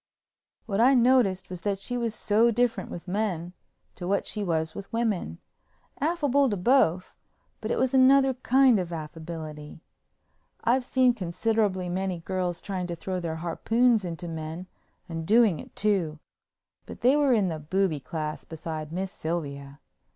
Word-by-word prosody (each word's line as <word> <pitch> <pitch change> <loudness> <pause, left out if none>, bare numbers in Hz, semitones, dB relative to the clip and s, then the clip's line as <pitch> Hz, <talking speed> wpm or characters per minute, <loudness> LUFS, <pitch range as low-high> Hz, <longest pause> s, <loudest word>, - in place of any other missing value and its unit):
What 205 -1 0
I 260 +3 +6
noticed 235 -7 +3
was 180 -2 -6
that 200 0 -1
she 245 +5 -4
was 230 -2 -2
so 215 +2 +3
different 235 -4 0
with 175 - -8
men 180 -3 -2 0.4
to 175 - -7
what 200 +1 +1
she 210 - -2
was 160 -3 -1
with 200 - -9
women—affable 265 - -2
to 205 - -1
both, 185 -4 +2 0.5
but 215 - -4
it - - 0
was 260 0 +1
another 265 +1 +5
kind 255 -2 +4
of 175 -2 -4
affability. 155 -1 -7 0.8
I've 250 +3 +2
seen 255 0 +3
considerably 195 -1 -1
many 185 0 -2
girls 180 0 -3
trying 185 -3 -4
to 170 - -4
throw 185 +2 -4
their 165 -2 -3
harpoons 225 +6 +2
into 175 0 -5
men 160 +2 -6 0.4
and 165 -2 -5
doing 210 -3 +4
it - - -12
too, 190 -7 0 0.7
but - - -10
they 255 +3 +5
were 285 -3 +3
in 205 -5 +2
the 160 -2 -4
booby 165 +1 0
class 150 -1 -5
beside 155 0 -6
Miss 190 +2 -3
Sylvia. 140 -5 -5
190 Hz, 155 wpm, -27 LUFS, 165-235 Hz, 0.8 s, I